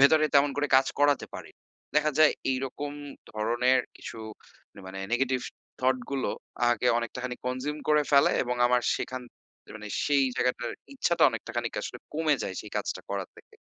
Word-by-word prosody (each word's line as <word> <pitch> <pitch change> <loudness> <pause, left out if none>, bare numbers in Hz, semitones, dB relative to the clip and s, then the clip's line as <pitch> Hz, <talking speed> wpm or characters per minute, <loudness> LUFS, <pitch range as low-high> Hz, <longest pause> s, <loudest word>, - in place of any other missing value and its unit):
ভেতরে 155 +3 +6
তেমন 140 +1 +6
করে 145 0 +1
কাজ 135 0 +4
করাতে 145 -1 +3
পারি। - - -8 0.5
দেখা 150 0 +4
যায় 155 -1 +7 0.2
এইরকম 135 +2 -3 0.4
ধরনের 120 +4 +2 0.2
কিছু - - -8 0.6
না - - -11
মানে 95 +1 -6
negative 130 0 +1 0.4
thought 130 0 +3
গুলো 135 -1 -1 0.3
আমাকে 120 0 +3
অনেকটাখানি 125 +2 -4
consume 135 +4 -2
করে 150 -1 +5
ফেলে 140 - +6
এবং 125 0 -2
আমার 125 0 +3
সেখান 130 0 -4 0.5
এ - - -13
মানে 105 -1 -8 0.2
সেই 140 -2 +4
জায়গাটার 125 0 0 0.2
ইচ্ছাটা 175 -10 +1
অনেকটা 115 +1 -6
খানিক 120 -1 -2
আসলে 125 - -6 0.2
কমে 155 -1 +3
যায় - - -4
সেই - - -10
কাজটা - - -2
করা - - -1
থেকে। 445 - -18
130 Hz, 165 wpm, -28 LUFS, 125-145 Hz, 0.6 s, যায়